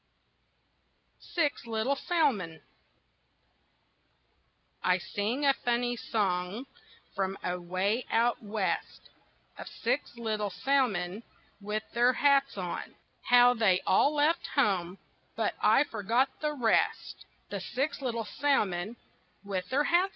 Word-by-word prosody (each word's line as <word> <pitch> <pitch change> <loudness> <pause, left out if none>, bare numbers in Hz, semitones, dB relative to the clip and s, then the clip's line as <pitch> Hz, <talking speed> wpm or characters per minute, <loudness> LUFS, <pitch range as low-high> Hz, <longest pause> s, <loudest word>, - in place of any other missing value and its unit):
SIX 295 -7 0
LITTLE 225 +5 0
SALMON 260 - 0 2.2
I 180 0 +3
sing 215 +9 -2
a 275 - +6
funny 240 0 +1
song 200 0 -2 0.5
from 195 0 -1
away 185 +6 -1
out 235 +1 +2
west, 210 -2 -3 0.5
Of - - -7
six 245 +1 -2
little 215 -3 -2
salmon 205 -3 0 0.4
with 210 +1 -3
their 245 +2 +4
hats 275 -2 +3
on; 180 -2 -5 0.3
How 245 0 +7
they 210 -6 +2
all 285 +10 +3
left 300 +3 +2
home 190 -9 +1 0.4
but - - 0
I - - +5
forget 230 +2 0
the 300 -1 0
rest 235 -5 0 0.2
The - - -3
six 280 +3 -3
little 235 -4 -2
salmon 215 -7 0 0.5
with 190 -2 -4
their 275 +4 +2
hats 345 +4 +3
on. - - -8
230 Hz, 115 wpm, -29 LUFS, 195-275 Hz, 2.2 s, How